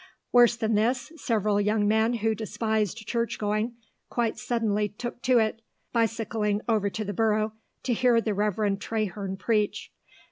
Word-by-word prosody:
Worse 240 -1 +6
than 225 -1 -1
this, 240 +7 +1
several 215 -8 +1
young 210 0 +2
men 220 +2 +3
who 225 -1 +1
despised 220 0 -2
church 235 0 -1
going, 215 +3 -1 0.3
quite 235 -2 0
suddenly 210 -3 0
took 240 +4 -7
to 255 -1 +4
it, 220 0 +1 0.3
bicycling 225 -2 0
over 215 -3 +2
to 215 +2 -4
the 205 - -3
Borough 215 +1 +1 0.3
to 250 - +1
hear 240 0 +4
the 220 -2 -1
Reverend 205 0 0
Traherne 200 -3 -3
preach. 210 +1 -1
220 Hz, 150 wpm, -27 LUFS, 210-230 Hz, 0.3 s, Worse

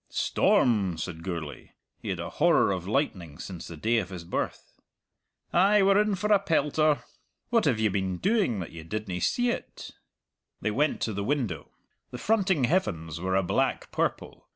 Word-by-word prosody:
"Storm!" 100 -8 +2
said 80 0 -5
Gourlay. 85 -4 -6 0.3
He - - -6
had - - -2
a - - -5
horror - - +3
of 90 -1 -3
lightning 95 - -1
since 90 -1 -8
the 85 - -9
day 115 +7 +2
of 90 -5 -4
his 90 -3 -7
birth. 85 - -4 0.8
"Ay, 200 +3 +5
we're 195 +1 +5
in 210 -1 +1
for 210 +3 +1
a 200 - +5
pelter. 155 -4 +1 0.5
What 230 -5 +3
have 125 -7 +2
you 110 -2 +2
been 95 -2 -1
doing 195 - +1
that 85 - -7
you 80 -1 -9
didna 95 0 -4
see't?" 245 -1 -1 0.7
They 105 - -1
went 145 +7 0
to 110 - -1
the 100 0 -3
window. 115 - -2 0.4
The 125 - -7
fronting 190 - +1
heavens 85 - 0
were 95 +1 0
a 95 - +3
black 90 - 0
purple. - - -3
110 Hz, 175 wpm, -27 LUFS, -, 0.8 s, Ay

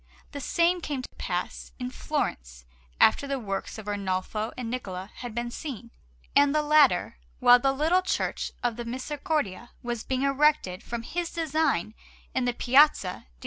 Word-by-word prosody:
The 285 - -6
same 345 +5 +2
came 285 -5 -3
to - - -7
pass - - -4
in 250 -1 -4
Florence - - -3 0.3
after 280 - +5
the 275 0 -1
works 200 -4 -4
of 220 - -8
Arnolfo 205 +2 -2
and 250 -2 -4
Niccola 190 -5 -5
had 240 -3 -7
been 240 0 -2
seen; 240 -5 -7 0.4
and 285 +1 +5
the 305 - +3
latter, 290 - +4 0.2
while 245 0 +7
the 270 +2 +2
little 315 +7 +2
Church 370 - -2
of 240 -2 0
the 240 - -5
Misericordia 260 - -3
was 240 -2 -3
being 260 0 -1
erected 275 -9 +2
from 235 -1 -5
his 345 +6 -3
design 310 - 0 0.4
in 255 - 0
the 245 - +1
Piazza 260 -6 +4
di - - -9
S. - - -21
255 Hz, 170 wpm, -27 LUFS, 220-295 Hz, 0.4 s, while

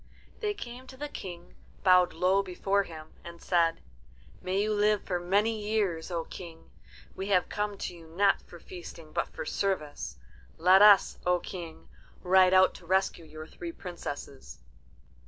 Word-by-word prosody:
They 420 -2 -1
came 250 -4 -9
to 260 - -12
the 295 +2 -4
King, 175 -9 -9 0.3
bowed 180 -2 +5
low 185 +4 +3
before 195 +1 0
him, 160 -4 -10
and 170 0 -10
said, 165 -2 +1 0.6
"May 190 +2 0
you 215 0 0
live 210 0 +2
for 180 -2 -2
many 205 +5 +1
years, 205 -6 -1
O 170 -2 -2
King. 170 -3 -11 0.4
We 190 - -4
have 185 -3 +2
come 205 -1 -2
to 180 - -5
you 165 -1 -14
not 195 +5 +2
for 175 - -14
feasting 165 -3 -11
but - - 0
for - - -7
service. 155 -6 -2 0.4
Let 185 +4 +6
us, 205 -1 +6
O 180 0 +3
King, 170 -2 -8 0.4
ride 185 0 +5
out 185 0 +5
to 170 - -17
rescue 190 -2 +1
your 155 0 -9
three 340 - -8
princesses." 145 - -8
185 Hz, 160 wpm, -29 LUFS, 170-200 Hz, 0.6 s, Let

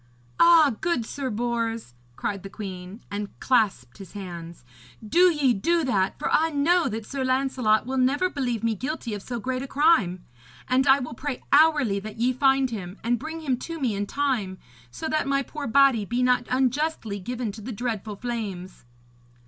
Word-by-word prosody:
'Ah, 330 -5 +6
good 340 -10 0
Sir 270 +2 -4
Bors,' 230 - -2 0.2
cried 195 +7 -3
the 195 - -8
queen, 190 +1 -8
and 205 0 -5
clasped 200 - +1
his 195 -3 -11
hands. 170 -7 -8 0.4
'Do 355 +8 +5
ye 285 -6 +2
do 335 - +1
that, 200 -8 0
for - - -3
I 325 +1 +3
know 325 +4 +2
that 220 0 -5
Sir 275 +2 -4
Lancelot 255 -4 +1
will 265 +1 -2
never 280 +8 +2
believe 250 - -3
me 230 -1 +1
guilty 255 +1 -4
of 205 - -5
so 240 +3 -5
great 255 +3 -3
a 275 - -5
crime. 260 - +2 0.4
And 260 +2 +2
I 270 0 +7
will 250 -4 -5
pray 270 +2 -5
hourly 290 -9 +4
that 215 +2 -9
ye 245 +3 +1
find 270 0 +2
him 190 -3 -6
and 235 +1 +1
bring 320 +3 -6
him 265 -5 0
to 330 +5 -6
me 250 -6 0
in 200 0 -3
time, 245 -10 -1 0.3
so 120 +2 -6
that 310 -2 0
my 275 0 +1
poor 295 +1 -6
body 265 -2 +4
be 240 +5 -1
not 250 -1 +2
unjustly 255 -4 0
given 240 +2 -4
to 215 +2 -10
the 245 +5 -6
dreadful 220 -2 -4
flames.' 200 - -6
245 Hz, 185 wpm, -25 LUFS, 205-275 Hz, 0.4 s, I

